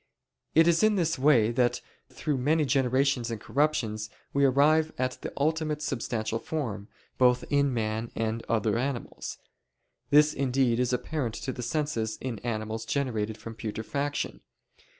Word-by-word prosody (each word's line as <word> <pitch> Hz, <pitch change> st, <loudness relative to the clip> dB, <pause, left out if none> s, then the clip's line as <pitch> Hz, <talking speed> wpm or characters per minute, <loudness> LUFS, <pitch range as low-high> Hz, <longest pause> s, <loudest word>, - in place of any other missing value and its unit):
It 165 Hz, +1 st, +6 dB
is 165 Hz, -1 st, +4 dB
in 215 Hz, -1 st, +4 dB
this 165 Hz, -7 st, 0 dB
way 125 Hz, -6 st, +4 dB
that 120 Hz, 0 st, +1 dB, 0.3 s
through 145 Hz, -4 st, -2 dB
many 150 Hz, +4 st, +2 dB
generations 130 Hz, -1 st, +2 dB
and 115 Hz, -2 st, -4 dB
corruptions 110 Hz, -7 st, 0 dB, 0.2 s
we 140 Hz, 0 st, +4 dB
arrive 155 Hz, +4 st, +4 dB
at 130 Hz, 0 st, -2 dB
the -, -, -5 dB
ultimate 155 Hz, 0 st, 0 dB
substantial 115 Hz, -4 st, -2 dB
form, 125 Hz, -, -4 dB, 0.3 s
both 125 Hz, -1 st, +4 dB
in 140 Hz, -1 st, +3 dB
man 110 Hz, -1 st, -2 dB
and 115 Hz, 0 st, -2 dB
other 110 Hz, -1 st, +1 dB
animals. 130 Hz, -1 st, -4 dB, 0.7 s
This 150 Hz, +1 st, +6 dB
indeed 130 Hz, -3 st, +1 dB
is 125 Hz, 0 st, +1 dB
apparent 125 Hz, -2 st, -2 dB
to 130 Hz, -, -4 dB
the 125 Hz, -, -6 dB
senses 120 Hz, -4 st, -1 dB
in 120 Hz, -5 st, -4 dB
animals 110 Hz, -1 st, -3 dB
generated 110 Hz, -5 st, -1 dB
from 115 Hz, +1 st, -8 dB
putrefaction. 115 Hz, +6 st, -3 dB
130 Hz, 145 wpm, -28 LUFS, 115-145 Hz, 0.7 s, It